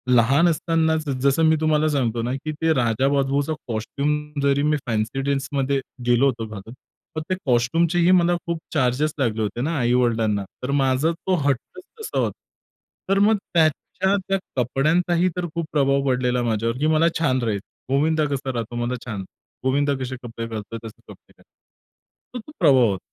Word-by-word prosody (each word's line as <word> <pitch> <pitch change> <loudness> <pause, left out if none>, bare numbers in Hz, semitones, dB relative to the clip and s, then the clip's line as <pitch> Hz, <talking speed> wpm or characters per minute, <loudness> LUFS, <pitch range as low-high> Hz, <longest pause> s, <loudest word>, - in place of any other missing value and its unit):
लहान 135 +8 +4
असतानाच, 160 -1 +1
जसं 140 +4 +3
मी 160 0 +5
तुम्हाला 155 -1 +2
सांगतो 120 -6 0
ना, 120 +2 -2
की 135 +3 -4
ते 160 0 +3
राजाबाबूचा 135 +4 +1
कॉस्ट्यूम, 145 +6 -2
जरी 140 0 +2
मी 150 0 +2
फॅन्सी 115 +3 -1
ड्रेसमध्ये 140 0 -1 0.3
गेलो 120 +2 +4
होतो 115 -4 0
घालून, 110 +1 -9 0.4
मग - - 0
ते 185 - +1
कॉस्ट्यूमचेही 165 +8 +2
मला 175 -1 +4
खूप 170 -1 -2
चार्जेस 145 +1 +1
लागले 115 -4 0
होते 110 +3 -2
ना 160 +4 -1
आई-वडिलांना, 115 -4 +1 0.2
तर 130 - -2
माझा 135 +2 +2
तो 185 +2 -1
हट्टच 140 - -2 0.2
तसा 440 - -3
होता. - - -1 0.7
तर 195 - +4
मग 210 +2 +4 0.2
त्याच्या 170 +4 +1
त्या 195 - +1 0.2
कपड्यांचाही 165 +8 +2
तर 180 - -1
खूप 170 -1 -1
प्रभाव 140 -1 +2
पडलेला 125 -1 +1
माझ्यावर, 115 +1 -1
की 150 - +1
मला 160 +1 +4
छान 130 -6 +1
राहील, 110 -3 0 0.3
गोविंदा 155 +3 +2
कसा 135 -1 -2
राहतो, 120 0 -4
मला 125 +1 -2
छान 110 -5 -4 0.4
गोविंदा 140 +2 +2
कसे 130 0 -4
कपडे 115 -1 -6
घालतोय, 110 0 -6
तसे 110 - -10
कपडे - - -15
घालायचे. - - -22 0.9
तर - - -3
तो - - -10
प्रभाव 135 -8 +5
होता. 95 - -3
140 Hz, 165 wpm, -23 LUFS, 120-160 Hz, 0.9 s, मी